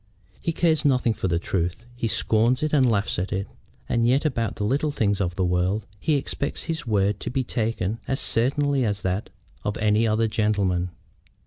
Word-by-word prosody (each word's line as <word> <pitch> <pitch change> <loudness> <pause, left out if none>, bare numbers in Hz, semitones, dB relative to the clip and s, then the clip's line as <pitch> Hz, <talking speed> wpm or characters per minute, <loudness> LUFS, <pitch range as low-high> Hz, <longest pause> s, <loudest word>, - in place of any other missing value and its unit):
"He 165 - 0
cares 160 -1 +2
nothing 125 -5 +3
for 95 - -2
truth. 90 +5 -2
He 120 -1 -1
scorns 115 +4 +2
it 155 - -1
and 135 -4 +5
laughs 100 -4 0
at 95 - -3
it. 95 +1 -1 0.4
And 115 0 +2
yet 135 +5 +2
about 115 -7 0
the - - -3
little 140 +8 +1
things 100 -7 0
of 90 -2 -1
the 95 - +1
world 90 +4 0
he 155 - +1
expects 140 0 -2
his 160 -5 -3
word 100 -2 +1
to - - -4
be 130 +2 0
taken 115 -3 -2
as 135 - 0
certainly 140 +3 +2
as 105 -3 -1
that 95 +3 -1 0.3
of 105 - -2
any 110 +1 +2
other 110 +1 +2
gentleman." 100 -5 +1
110 Hz, 190 wpm, -24 LUFS, 100-130 Hz, 0.4 s, and